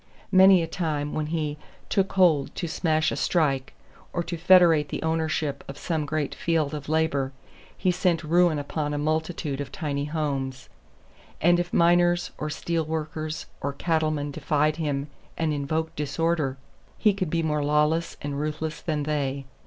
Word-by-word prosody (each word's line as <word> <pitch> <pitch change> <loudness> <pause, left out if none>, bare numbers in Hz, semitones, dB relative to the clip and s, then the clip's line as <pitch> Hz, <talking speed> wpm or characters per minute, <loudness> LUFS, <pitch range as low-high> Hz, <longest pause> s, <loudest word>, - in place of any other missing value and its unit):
Many 190 -1 +7
a - - -3
time 155 -4 -2
when 155 -1 -2
he 155 -2 -2 0.3
"took 195 -1 0
hold" 170 -7 +3
to 175 - -3
smash 160 -1 +1
a - - -2
strike, 140 -6 0 0.4
or 175 - -1
to 170 +1 -4
federate 170 -4 +5
the - - -4
ownership 160 -2 -1
of 140 - -8
some 155 -2 -2
great 155 -1 -1
field 160 -4 0
of 145 -1 -6
labor, 150 -4 +1 0.4
he 185 - +2
sent 175 -2 +1
ruin 170 0 +3
upon 145 +1 -2
a - - -1
multitude 155 -1 -1
of 140 - -6
tiny 145 -3 -2
homes; 140 -4 -3 0.7
and 175 +2 +4
if 175 0 -2
miners 175 0 +3
or 150 - -2
steel 165 +2 -1
workers 155 0 -4 0.2
or 140 0 -2
cattlemen 155 -2 0
defied 150 +1 +1
him 145 -3 -2 0.3
and 160 -2 0
invoked 155 +3 -2
disorder, 150 -2 0 0.4
he 210 -2 +4
could 190 -4 -2
be 165 +1 0
more 150 -2 0
lawless 150 +3 +1
and 145 -1 -3
ruthless 155 +1 -3
than 150 -3 -1
they. 140 -2 -2
155 Hz, 160 wpm, -26 LUFS, 145-165 Hz, 0.7 s, Many